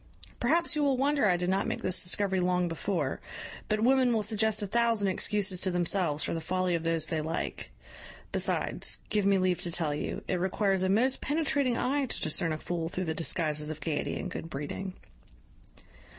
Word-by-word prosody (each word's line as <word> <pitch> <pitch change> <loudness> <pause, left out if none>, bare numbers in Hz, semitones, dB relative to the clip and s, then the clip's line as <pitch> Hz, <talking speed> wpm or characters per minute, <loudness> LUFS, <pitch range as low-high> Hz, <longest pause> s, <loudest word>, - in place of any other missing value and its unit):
Perhaps 335 +7 +2
you 300 - +1
will 275 -2 +2
wonder 280 -2 +2
I 180 -2 +3
did 180 +1 -1
not 195 - +1
make - - -3
this 185 - +3
discovery 190 +1 +1
long 180 0 +1
before; 175 +3 -2 0.5
but 215 0 +1
women 255 0 +4
will 220 -2 +1
suggest 215 0 +2
a - - 0
thousand 230 -1 +2
excuses 190 -1 +1
to 190 - +2
themselves 175 -3 +1
for - - -2
the 165 - -3
folly 185 +2 0
of 165 -1 -1
those 165 -1 0
they 155 0 -2
like: 160 +2 -4 0.6
besides, - - 0
give 205 -2 +1
me 200 -1 +4
leave 185 -1 +1
to 175 - -2
tell 160 -3 +1
you, 145 - -4
it 180 - 0
requires 190 +1 +1
a 190 - +1
most 245 +7 +2
penetrating 285 -4 +1
eye 275 +1 0
to - - -4
discern 160 +1 +1
a 155 - -1
fool 165 0 -3
through 185 +1 -3
the 160 - -1
disguises 155 -2 0
of 155 - -5
gaiety 155 -3 -2
and - - -5
good 165 - -6
breeding. 160 +6 -5
185 Hz, 195 wpm, -29 LUFS, 165-220 Hz, 0.6 s, women